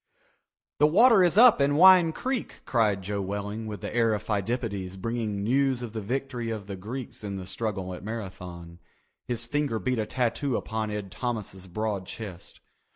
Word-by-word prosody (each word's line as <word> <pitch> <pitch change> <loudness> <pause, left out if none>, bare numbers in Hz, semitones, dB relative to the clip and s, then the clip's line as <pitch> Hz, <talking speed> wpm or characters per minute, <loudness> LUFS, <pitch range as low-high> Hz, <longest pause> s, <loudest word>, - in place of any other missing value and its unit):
"The 150 - +6
water 215 +4 +6
is 175 +2 +3
up 235 - +8
in 140 +1 +3
Wine 180 0 +7
Creek," 255 +7 -4
cried 105 -5 +1
Joe 100 +1 -2
Welling 105 +3 -4
with 105 -4 -6
the - - -5
air 115 -2 +3
of 105 - -5
Pheidippides 100 -3 -2
bringing 110 -1 -2
news 130 +2 +1
of 115 -3 -6
the 110 - -3
victory 125 +1 -3
of 110 -3 -4
the 100 -1 -6
Greeks 110 +5 -7
in 100 -1 -4
the 95 -1 -6
struggle 95 -2 -3
at 90 - -9
Marathon. 90 -6 -7 0.5
His 120 -2 -2
finger 145 -2 -1
beat 125 +1 -1
a 110 - -1
tattoo 130 +1 0
upon 110 -1 -3
Ed 105 -2 -5
Thomas's 105 -6 -4
broad 100 0 -3
chest. 100 -6 -8
110 Hz, 175 wpm, -27 LUFS, 100-130 Hz, 0.5 s, up